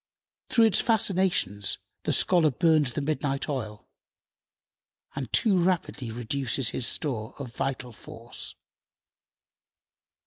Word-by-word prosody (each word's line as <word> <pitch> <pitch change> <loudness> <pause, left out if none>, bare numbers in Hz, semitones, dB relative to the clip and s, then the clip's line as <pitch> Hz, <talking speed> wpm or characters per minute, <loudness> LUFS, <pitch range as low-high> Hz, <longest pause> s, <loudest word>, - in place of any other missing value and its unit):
Through 230 -2 +4
its 220 - +3
fascinations 185 - +1 0.3
the - - +1
scholar 175 -4 +4
burns 150 -2 +2
the 145 - -3
midnight 145 -2 -2
oil, 110 -8 -5 1.3
and 135 -4 -5
too 215 -4 +3
rapidly 170 -8 -1
reduces 120 +2 0
his 120 - +1
store 120 -6 -1
of 130 -5 -8
vital 130 -2 -3
force. 115 +1 -9
135 Hz, 105 wpm, -27 LUFS, 120-170 Hz, 1.3 s, Through